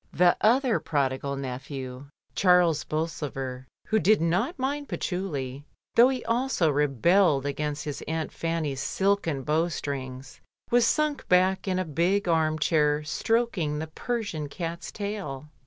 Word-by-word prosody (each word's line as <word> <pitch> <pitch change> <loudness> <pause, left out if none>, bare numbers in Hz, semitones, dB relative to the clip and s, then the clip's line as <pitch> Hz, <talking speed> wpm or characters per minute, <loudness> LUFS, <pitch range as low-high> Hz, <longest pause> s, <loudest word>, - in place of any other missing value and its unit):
The 175 0 +4
other 245 +1 +3
prodigal 140 -1 -1
nephew, 130 0 -6 0.3
Charles 180 -4 +4
Bolsover, 135 -5 -4 0.2
who 220 - +2
did 215 +1 +4
not 185 - 0
mind 285 +2 -2
patchouli, 145 -8 -3 0.3
though 240 +2 +7
he 255 -2 -3
also 230 - +1
re 145 +1 +2
belled 150 - +3
against 150 +1 -3
his 145 -2 -4
aunt 160 0 -2
Fanny's 160 -5 -2
silken 190 -8 0
bow 155 +4 +1
strings, 135 -4 -6 0.3
was 240 0 +5
sunk 305 -2 0
back 185 +2 +3
in 185 -1 +1
a 185 - 0
big 175 +6 +1
arm 160 -2 +2
chair 150 -1 +2
stroking 175 -1 0
the 155 - -3
Persian 160 -3 -4
cat's 170 +2 -5
tail. 190 -9 -5
160 Hz, 140 wpm, -27 LUFS, 145-200 Hz, 0.3 s, though